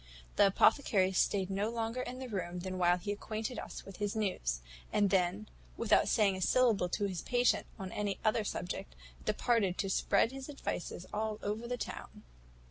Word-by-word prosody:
"The 205 - +6
apothecary 195 -2 +4
staid 190 0 +1
no 200 +3 0
longer 230 +1 -2
in 255 0 -5
the 260 0 -6
room 180 -5 -3
than 185 0 -4
while 175 0 +4
he 190 +3 -4
acquainted 215 +3 -4
us - - -7
with 195 - -10
his 205 0 -2
news; 120 - -1 0.3
and 205 -2 +3
then, 190 +2 +1 0.3
without 220 -2 +3
saying 200 -3 +3
a 185 - -5
syllable 220 -3 +3
to 205 +3 0
his 185 -4 -3
patient 245 0 +2
on 190 -3 -6
any 205 -2 -2
other 220 +1 +3
subject, 175 - -4 0.3
departed 210 -7 +1
to 195 -1 -1
spread 225 - +3
his 270 +1 -7
advices 185 -10 -4
all 215 0 -1
over 215 +3 -2
the 245 0 -2
town. - - -7
205 Hz, 180 wpm, -33 LUFS, 185-225 Hz, 0.3 s, The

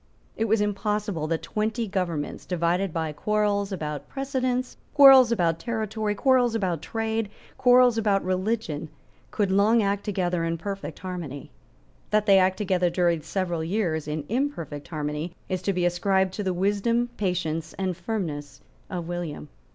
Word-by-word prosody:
It 225 - 0
was 220 -1 +2
impossible 210 -4 -1
that 165 0 -2
twenty 220 +2 -2
governments, 175 -6 -3
divided 180 +2 0
by 160 -1 -2
quarrels 205 +2 0
about 150 -5 -4
precedence, 255 -2 -2 0.2
quarrels 270 -4 +9
about 170 -7 +1
territory, 220 -2 -2
quarrels 250 -1 +3
about 180 -7 -1
trade, 225 -1 -2 0.3
quarrels 250 -2 +5
about 200 -3 +1
religion, 185 -5 -1 0.4
could 205 -3 0
long 210 +4 +4
act 200 0 0
together 180 -4 -1
in 165 0 -1
perfect 195 +3 -5
harmony. 170 - -6 0.6
That 215 0 +2
they 195 -2 +6
acted 185 0 +2
together 180 -2 +2
during 170 -2 +1
several 175 -2 -2
years 165 -4 -1
in 150 -1 -3
imperfect 205 - -3
harmony 155 +2 -4
is 185 -1 -2
to 195 - 0
be 180 -2 0
ascribed 190 +1 +1
to 205 - -3
the 190 - 0
wisdom, 205 +6 +1
patience 175 -5 -2
and 185 -2 -1
firmness 170 -7 -4 0.3
of 175 -3 -4
William. 170 -4 -5
190 Hz, 150 wpm, -26 LUFS, 170-220 Hz, 0.6 s, quarrels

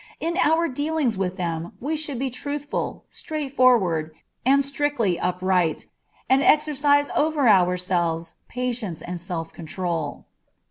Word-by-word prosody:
In 335 +1 -2
our 330 0 +3
dealings 290 -3 -1
with 190 0 -2
them 170 -2 -3
we 300 +5 -2
should 295 -4 -2
be 265 +1 -2
truthful, 285 +3 -4
straightforward, 250 - +1 0.3
and 275 +2 +4
strictly 280 -10 0
upright, 180 -2 0 0.4
and 265 +1 +4
exercise 290 -1 +3
over 300 -3 +2
ourselves 175 -4 +2
patience 240 -8 -3
and 175 -1 -5
self 170 -2 -5
control. 165 -2 -4
240 Hz, 120 wpm, -24 LUFS, 175-285 Hz, 0.4 s, and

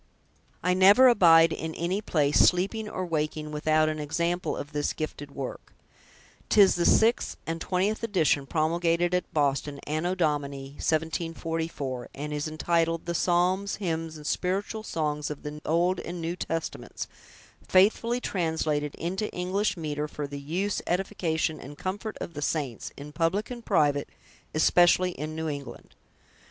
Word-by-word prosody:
I 180 - +3
never 200 +8 +7
abide 165 -8 +6
in 160 0 -5
any 180 +5 -1
place, 150 -9 +2
sleeping 200 +4 +3
or 185 - -3
waking, 155 -2 -2
without 155 +1 +2
an 155 0 -2
example 170 +5 -1
of 145 - -6
this 150 -1 -1
gifted 150 -2 -5
work. 140 -2 -7 0.7
'Tis 200 -2 +6
the 175 -1 +1
six 225 +2 +3
and 165 0 -4
twentieth 195 +4 0
edition, 165 -10 +1
promulgated 170 +3 +1
at 180 - -1
Boston, 140 -1 0
Anno 160 +5 -1
Domini 145 -5 -1
1744; 160 -4 -2
and 150 +2 -5
is 150 +1 -2
entitled, 165 +1 0
'The 170 - -2
Psalms, 180 +3 +1
Hymns, 165 -4 -3
and 150 - -11
Spiritual 195 +7 -1
Songs 150 -7 -2
of 150 - -7
the 150 0 -6
Old 175 +3 +2
and 175 +1 -6
New 165 +1 -3
Testaments; 165 -2 -4 0.6
faithfully 225 +5 +3
translated 160 -7 -1
into 190 +5 -3
English 190 +3 -1
Metre, 150 -2 -3
for 150 -1 -5
the 140 0 -6
Use, 180 +8 -2
Edification, 175 -4 -1
and 145 +2 -10
Comfort 205 +3 -4
of 170 - -6
the 145 - -6
Saints, 145 -7 -2
in 145 +1 -8
Public 170 +9 0
and 240 -1 -7
Private, 145 -8 +2 0.5
especially 175 +3 +4
in 155 -1 -6
New 160 0 -3
England'." 145 -2 -7
165 Hz, 145 wpm, -27 LUFS, 150-180 Hz, 0.7 s, never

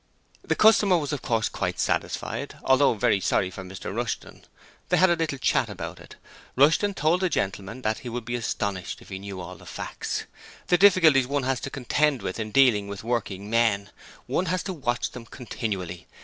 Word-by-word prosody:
The - - 0
customer 210 -4 +5
was 150 -2 -3
of 145 - -3
course 115 -2 0
quite - - -3
satisfied, - - -2
although 130 -1 +4
very 100 -1 +2
sorry 95 0 +1
for 95 - -8
Mr 95 +1 -7
Rushton. 120 -1 -4 0.5
They - - +3
had 185 +1 +5
a - - +4
little 160 -4 -2
chat - - +1
about - - -7
it. - - -13 0.4
Rushton 165 +9 +4
told 160 +3 +2
the 185 - +2
gentleman 100 - -3
that 110 0 0
he 125 - -7
would 120 0 -5
be 120 - -4
astonished 100 -5 -3
if - - -17
he 95 -1 -5
knew 100 -1 -7
all 90 0 -8
the - - -15
facts: - - -4 0.4
the 180 - +5
difficulties 165 -10 +6
one 140 0 -1
has 130 0 0
to - - -5
contend 140 +1 0
with - - -4
in 110 -1 -3
dealing 115 -5 +4
with 100 0 -7
working 105 -4 -2
men: 105 -3 +1 0.3
one 185 - -1
has 180 +2 0
to 190 - -4
watch 125 -6 -2
them 120 -2 -10
continually! 100 -8 -5
120 Hz, 195 wpm, -26 LUFS, 100-150 Hz, 0.5 s, difficulties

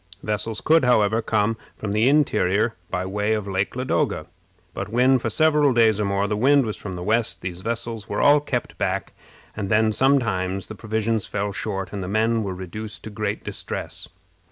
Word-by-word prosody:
Vessels 105 +1 -2
could, 160 -2 +4
however, 110 -2 +3
come 110 0 +1 0.2
from 105 - -4
the 110 +5 +3
interior 115 -7 +2 0.2
by 90 0 -2
way 105 +3 0
of 105 -2 -2
Lake 95 +3 -1
Ladoga; 130 +1 0 0.5
but - - -5
when 125 +3 +4
for 115 - -2
several 150 +2 +3
days 110 -3 +4
or - - +1
more 100 +1 0
the 105 - -1
wind 135 +4 +4
was 110 - -3
from 95 - -7
the 90 0 -5
west, 110 +3 0
these 90 -1 -5
vessels 115 -1 -4
were 105 - -2
all 145 +1 +6
kept 125 -4 -4
back, - - -1 0.4
and 100 -3 -3
then 110 +1 +3
sometimes 100 -9 +1
the - - -8
provisions 110 0 -1
fell 100 0 -2
short, 95 0 -4
and 100 - -3
the 90 - -4
men 110 +3 +1
were 95 -3 -3
reduced 105 +4 -6
to 110 - -7
great 105 - -3
distress. - - -5
110 Hz, 190 wpm, -23 LUFS, 100-115 Hz, 0.5 s, all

